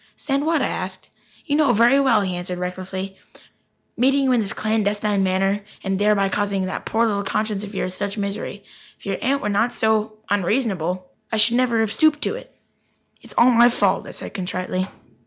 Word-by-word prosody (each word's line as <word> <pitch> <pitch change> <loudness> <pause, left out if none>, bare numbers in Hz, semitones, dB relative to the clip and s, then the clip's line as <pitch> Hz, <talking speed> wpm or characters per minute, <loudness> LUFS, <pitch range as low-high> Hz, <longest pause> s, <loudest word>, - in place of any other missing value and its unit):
"Stand 275 +2 -1
what?" 320 -4 +2
I - - +1
asked. 185 0 -5 0.4
"You 290 - 0
know 295 -5 +4
very 240 +5 +5
well," 260 -6 +4
he 185 -2 -2
answered 180 0 -4
recklessly. 185 +1 -5 0.8
"Meeting 270 +3 +3
you 265 - +2
in 245 - +3
this 205 -3 -1
clandestine 210 -1 0
manner, 195 +2 +1 0.2
and 195 -1 -1
thereby 205 -1 +3
causing 200 -1 -1
that 185 - -5
poor 230 +1 +2
little 205 -3 0
conscience 210 0 -2
of 205 0 -8
yours 185 -1 -2
such 200 +2 -3
misery. 200 0 -4 0.3
If - - -19
your 195 -1 -2
aunt 275 +2 0
were 210 - 0
not 230 +4 +1
so 220 -1 +1
unreasonable, 185 -3 0 0.2
I 220 - 0
should 230 +3 +4
never 240 -3 +2
have 220 -2 0
stooped 300 +4 +3
to - - 0
it." - - -9 0.7
"It - - -19
is - - -8
all 245 +2 +6
my 240 0 +6
fault," 240 - +1
I - - -7
said - - -8
contritely. 185 0 -3
210 Hz, 195 wpm, -22 LUFS, 195-235 Hz, 0.8 s, all